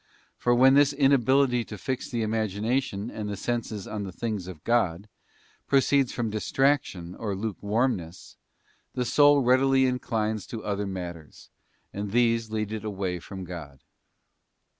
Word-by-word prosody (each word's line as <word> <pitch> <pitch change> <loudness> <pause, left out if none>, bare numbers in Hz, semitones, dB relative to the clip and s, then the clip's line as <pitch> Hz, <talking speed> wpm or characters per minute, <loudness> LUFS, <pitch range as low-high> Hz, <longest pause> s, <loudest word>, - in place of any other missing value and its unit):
For 120 0 +2
_ - - +1
when 130 +2 +7
this 145 0 +5
inability 135 -2 +3
to 105 - -8
fix 130 +3 -4
the 120 -3 -1
imagination 110 +1 -1
and 105 -1 -5
the 100 - -4
senses 110 -2 -3
on 105 - -4
_ - - -3
the 95 - -6
things 105 -2 -4
of 85 -5 -10
God 105 -5 +1 0.6
proceeds 135 -1 +3
from 115 -3 -2
distraction 110 -6 0
or 105 -1 -4
lukewarm 110 +4 0
ness, 85 +1 -11 0.6
the 125 - -1
soul 145 +2 +5
readily 130 +1 +4
inclines 110 -4 -1
to 115 - -6
other 100 -1 -2
matters, 85 -5 -8 0.4
and 100 +1 -4
these 115 0 +2
lead 110 -1 -2
it 110 -1 -4
away 95 -4 -3
from 95 +2 -8
God. 80 -6 -9
110 Hz, 155 wpm, -27 LUFS, 100-125 Hz, 0.6 s, when